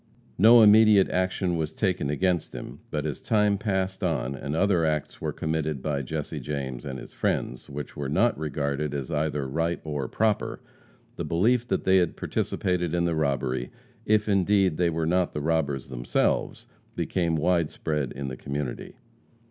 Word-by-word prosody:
No 115 +3 +8
immediate 105 -2 +6
action 90 -1 0
was 80 -1 -3
taken 90 -8 0
against 90 +3 0
him, - - -8
but 75 -1 -2
as 75 -4 -4
time 105 -2 +2
passed 95 -2 -1
on, 60 - 0
and 70 +2 -4
other 90 -1 +2
acts 75 -2 -2
were - - -1
committed 80 -2 -2
by 70 0 -2
Jesse 75 +3 -4
James 65 -4 -4
and 65 -2 -5
his - - -10
friends, 60 - -2
which 70 +1 -7
were 70 -2 -4
not 115 +11 +2
regarded 75 -1 -2
as 70 -3 -4
either 75 -2 -1
right 80 +5 -1
or 75 -4 -3
proper, 110 - 0 0.6
the - - -2
belief 115 +8 +2
that - - -1
they 95 0 +4
had 90 -3 +1
participated 90 -2 -1
in 85 0 +1
the 85 - +1
robbery, 70 -5 -1 0.3
if, 110 -1 +2
indeed, 100 -3 +3
they 90 -1 +2
were 80 0 -1
not 90 +2 +1
the - - -1
robbers 70 -4 -1
themselves, - - -1 0.3
became 85 -3 0
wide 85 0 +2
spread 75 -4 -2
in 70 0 -5
the 65 -1 -5
community. 70 -2 -5
80 Hz, 170 wpm, -26 LUFS, 70-95 Hz, 0.6 s, No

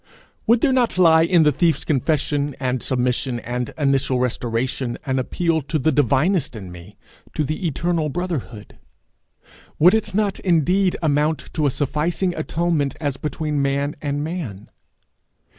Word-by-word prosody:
Would 235 +1 +4
there 270 - +3
not 245 -6 +1
lie, 165 -3 +6
in 170 0 +4
the 150 - +4
thief's 160 +3 +1
confession 145 0 0
and 130 -2 -1
submission 125 -1 -1
and 125 0 -3
initial 135 -3 +1
restoration, 125 0 -2
an 130 -1 0
appeal 165 +5 0
to 140 +3 -2
the 155 +2 +1
divinest 145 - +1
in 95 -4 -8
me 90 +3 -12 0.4
to 155 - +1
the 155 +5 -2
eternal 165 +1 -1
brotherhood? 145 - -5 1.0
Would 175 +4 +6
it 215 -3 -1
not 205 -2 0
indeed 180 +2 +2
amount 150 +1 0
to 150 -2 +1
a - - +3
sufficing 155 +7 -1
atonement 160 -3 -1
as 145 -4 -2
between 150 -1 -2
man 140 +1 0
and 145 0 -2
man? 150 - -6
150 Hz, 145 wpm, -21 LUFS, 130-170 Hz, 1.0 s, lie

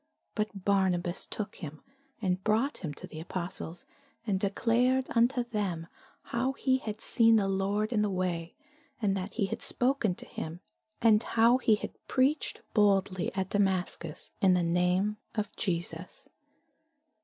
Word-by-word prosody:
But 210 -3 -3
Barnabas 185 -3 +1
took 210 -1 -5
him, 155 -3 -8 0.4
and 185 0 0
brought 225 +7 +1
him 160 -5 -4
to - - -9
the 155 - -9
apostles, 175 0 -5 0.4
and 200 -4 0
declared 240 +6 +2
unto 245 +2 +3
them 200 -8 -2 0.4
how 255 +3 -1
he 260 -1 +1
had 215 -3 -5
seen 230 -1 +4
the 205 -3 +3
Lord 200 +3 0
in 210 - +2
the 210 - +1
way, 180 -2 -2 0.4
and 200 -4 +1
that 195 +2 -4
he 210 - +1
had 195 - -4
spoken 250 -7 +2
to - - -8
him, 160 +2 -6 0.4
and 220 -2 +6
how 235 +2 +4
he 225 -4 +4
had - - -6 0.2
preached 275 +4 +1
boldly 195 -3 +2
at 190 0 -2
Damascus 185 -5 -1
in 185 -2 +5
the 180 - +2
name 180 +5 +1 0.2
of 210 -1 -3
Jesus. 170 -1 -2
200 Hz, 150 wpm, -30 LUFS, 180-225 Hz, 0.4 s, and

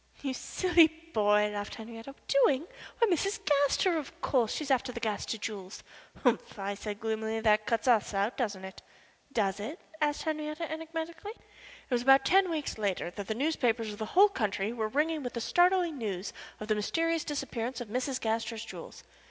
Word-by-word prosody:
"You 270 -2 -1
silly 345 +3 +4
boy," 210 -11 +1
laughed 205 0 -4
Henriette. 225 0 -9 0.2
"Doing? 275 +1 +4 0.3
Why, 465 - +4
Mrs. 395 +3 +1
Gaster, 295 +4 +3
of 290 - -9
course. 245 -5 +1
She - - -2
is 280 - -3
after 260 -1 +2
the 235 - -6
Gaster 220 0 -2
jewels." 205 -3 -6 0.4
"Humph!" - - +1
I 200 0 -2
said, 205 0 -6
gloomily. 220 0 -2
"That 215 -1 +3
cuts 230 +3 0
us 230 -4 +4
out, 200 +4 0
doesn't 205 -6 -2
it?" 190 - -10 0.5
"Does 200 -5 0
it?" 290 - -5 0.2
asked 295 -1 +1
Henriette, 305 -1 -3
enigmatically. 325 +4 -5
It - - -21
was 240 - +2
about 270 +2 +6
ten 385 0 +5
weeks 305 -8 -3
later 195 -4 -1
that 200 +1 -7
the 220 - -1
newspapers 235 -6 0
of 205 - -11
the 220 - -3
whole 410 +2 +9
country 215 - -1
were 220 -2 -1
ringing 305 +6 0
with 245 -2 -4
the 235 - -3
startling 350 +1 +3
news 195 -3 -3 0.3
of 215 - -6
the 215 - +3
mysterious 330 +10 0
disappearance 260 -4 -3
of 240 -4 -6
Mrs. 255 +3 -1
Gaster's 225 0 -2
jewels. 220 - -9
245 Hz, 185 wpm, -30 LUFS, 215-315 Hz, 0.5 s, whole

